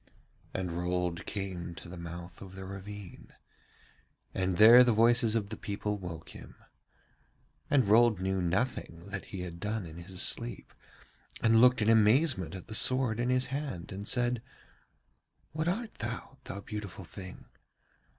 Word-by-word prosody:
And 90 -2 -3
Rold 90 0 -2
came 95 -4 -5
to - - -11
the 90 - -8
mouth 85 +1 -8
of 95 -1 -10
the 95 0 -7
ravine, 100 0 -9 1.0
and 95 -2 -1
there 115 +4 +9
the 125 - +3
voices 115 +1 +4
of 105 -3 -1
the 110 - -4
people 105 0 -3
woke 85 -3 -8
him. - - -12 1.1
And 135 -3 +4
Rold 110 0 +5
knew 95 0 -1
nothing 90 -2 -2
that 100 -1 -5
he 95 - -7
had 85 -1 -7
done 105 +1 -3
in 80 0 -10
his 90 +2 -7
sleep, - - 0 0.7
and 115 0 +4
looked 125 -2 +5
in 105 - +2
amazement 110 - +3
at 95 - -8
the 110 - -9
sword 125 0 +4
in 120 +1 0
his 130 0 +2
hand 135 - -4
and 100 +2 -6
said: 120 -2 0 1.1
'What 155 +2 -2
art 220 +5 -2
thou, 115 +1 -6
thou 100 - -6
beautiful 100 -3 -7
thing? 90 +1 -10
100 Hz, 155 wpm, -30 LUFS, 90-120 Hz, 1.1 s, there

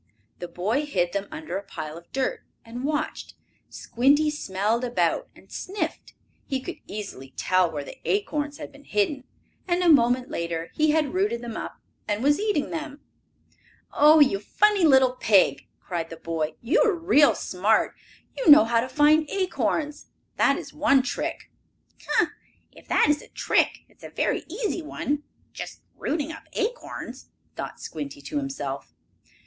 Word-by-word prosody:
The 175 - -5
boy 220 +13 -1
hid 175 -10 0
them 200 0 -2
under 310 -9 -5
a - - -11
pile 155 -5 -7
of 170 +1 -13
dirt, 270 - -1 0.2
and 240 +2 -7
watched. 295 +1 -3 0.3
Squinty 285 +5 +2
smelled 220 -3 -1
about, 245 -1 0
and - - -19
sniffed. 400 +3 -4 0.3
He 270 -2 -1
could 260 - -7
easily 135 -11 -8
tell 185 -1 +2
where 150 -3 -4
the - - -11
acorns 300 -8 -1
had - - -8
been 285 0 -17
hidden, 245 +6 0 0.4
and, 355 0 +1
a 350 - +4
moment 250 -3 +4
later, 170 0 -3
he 310 0 +2
had 305 -1 +1
rooted 370 - 0
them 235 -2 -6
up - - -6 0.3
and 210 +2 -1
was 290 +1 +3
eating 415 -8 0
them. 310 -3 -5 0.9
"Oh, 305 +2 +7
you 265 -9 +5
funny 410 - +2
little 265 -4 +6
pig!" 220 -6 +3
cried 170 -3 -4
the 165 - -8
boy. 160 -1 -3
"You 295 - +2
are 435 -6 +2
real 330 -4 +4
smart! 205 +4 +1 0.4
You - - +1
know 295 -5 +10
how 230 0 +2
to 255 - -4
find 300 +3 +4
acorns. 305 - -1 0.3
That - - +3
is - - -8
one 285 -3 +3
trick." 275 - -4 0.6
"Ha! - - +2 0.4
If - - -17
that - - +4
is 295 0 +2
a - - -14
trick, - - +1
it - - -27
is - - -23
a - - -7
very - - -1
easy 390 0 -2
one 295 -2 -3 0.3
just - - -8
rooting 310 -1 -2
up 320 - -10
acorns," 485 +4 -4 0.3
thought - - -6
Squinty 290 +1 -6
to 295 - -4
himself. 275 -1 -4
280 Hz, 165 wpm, -25 LUFS, 210-310 Hz, 0.9 s, know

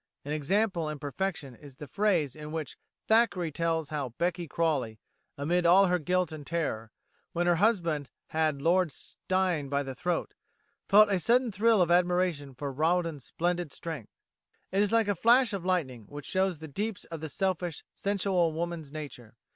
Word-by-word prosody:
An 145 - -4
example 170 +2 0
in 155 - -4
perfection 145 -1 -4
is 140 +2 -14
the 150 - -8
phrase 175 - +1
in 150 0 -8
which 155 -4 -4 0.3
Thackeray 220 -7 +3
tells 165 0 -1
how 140 -6 -4
Becky 175 0 -1
Crawley, 140 -9 -1 0.4
amid 170 +5 +1
all 180 +3 +6
her 180 -1 +2
guilt 180 +1 0
and 155 -2 -7
terror, 140 -8 -3 0.4
when 175 +1 0
her 175 -1 +3
husband 170 - +1 0.2
had 155 -3 0
Lord 180 -1 +3
Steyne 180 -1 -2
by 140 0 0
the 135 -1 -5
throat, 175 +6 -2 0.5
felt 210 +1 +6
a 190 - +2
sudden 240 +4 +2
thrill 210 0 +4
of 170 - -1
admiration 175 -6 +1
for 140 +1 -4
Rawdon's 160 -2 0
splendid 175 +1 -2
strength. 155 -10 -6 0.6
It 195 - +2
is 205 - +2
like 225 -2 +3
a 205 - +2
flash 235 +4 +4
of 190 -3 -4
lightning 135 - -1
which 145 +3 -9
shows 190 -2 0
the 160 +1 -9
deeps 205 +7 -3
of 165 -2 -8
the 160 - -5
selfish, 175 0 -2
sensual 190 -4 +1
woman's 165 -3 -4
nature. 130 -7 -8
170 Hz, 170 wpm, -29 LUFS, 145-185 Hz, 0.6 s, all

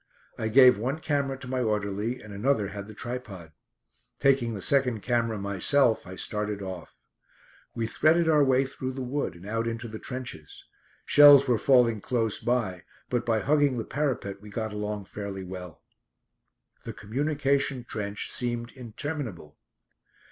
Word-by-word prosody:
I 110 - -3
gave 125 -1 +7
one 130 +7 -1
camera 140 -4 -1
to 130 - -9
my 130 0 -1
orderly 105 +2 -2
and 105 -1 -10
another 105 -1 0
had 100 0 -7
the 110 - -10
tripod. 110 -10 -6 0.7
Taking 130 -5 +2
the - - -5
second 125 -6 +1
camera 115 -2 0
myself, 105 +5 +2
I 95 - -8
started 105 +1 -3
off. 95 -3 -8 0.8
We 115 - -1
threaded 160 +8 +3
our 150 -2 +5
way 135 0 +3
through 130 0 -5
the 130 0 -5
wood 130 -6 -2
and 85 +2 -13
out 115 +2 -2
into 115 +1 -4
the 110 -1 -8
trenches. 125 - -7 0.4
Shells 145 -2 +8
were 120 -3 +2
falling 120 -4 +4
close 115 -3 -1
by, 115 -8 -1 0.3
but 120 -1 -1
by 110 -2 +2
hugging 145 -3 +2
the 110 - -3
parapet 120 -9 -2
we 105 - -11
got 110 0 -4
along 105 -1 -4
fairly 100 -1 -6
well. 90 -2 -9 1.0
The - - -6
communication 140 +2 -1
trench 105 -3 -4
seemed 120 -1 -3
interminable. 125 - -6
115 Hz, 155 wpm, -27 LUFS, 105-135 Hz, 1.0 s, Shells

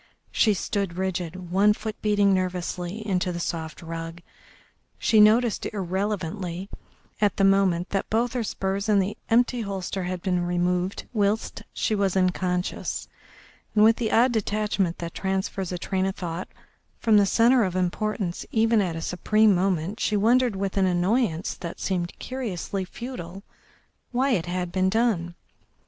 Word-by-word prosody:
She 215 -3 +3
stood 195 -2 -2
rigid, 180 -1 -3
one 200 +3 +5
foot 215 0 -5
beating 205 -2 +3
nervously 185 +2 -2
into 180 -2 0
the 170 - -4
soft 165 0 -4
rug. 165 +1 -6 0.7
She 215 -2 +4
noticed 225 +2 +4
irrelevantly 190 -1 -3 0.5
at 205 -3 +2
the 195 - +2
moment 195 -3 +3
that 195 - -1
both 230 +2 +1
her 245 -2 -1
spurs 195 0 -2
and 205 -1 +5
the 195 +2 -1
empty 240 +1 +3
holster 195 -2 -3
had 180 -1 -4
been 180 -2 +1
removed 180 +1 -1
whilst 210 0 0
she - - -1
was 195 -2 +1
unconscious, 180 -1 -1 0.7
and 210 - +6
with 225 +1 +6
the 225 -3 -1
odd 245 +3 +4
detachment 210 -5 0
that 170 -1 -6
transfers 190 -1 -2
a 180 - -2
train 190 +2 -1
of 190 - -3
thought 175 -1 -5 0.5
from 220 -2 +4
the 200 -1 +5
centre 235 +4 +4
of 185 -2 -2
importance 185 0 -1
even 225 -1 +3
at 175 -4 -1
a 165 - -4
supreme 215 +5 +3
moment, 185 +1 0
she 210 - +1
wondered, 240 +2 +3
with 195 0 -3
an 190 -1 +3
annoyance 185 0 +1
that 170 -2 -7
seemed 175 -3 -1
curiously 205 -7 -4
futile, 195 -3 -8 0.7
why 260 +2 +1
it 180 -8 0
had 180 0 -2
been 185 +1 +2
done. 195 -6 0
195 Hz, 155 wpm, -25 LUFS, 180-215 Hz, 0.7 s, and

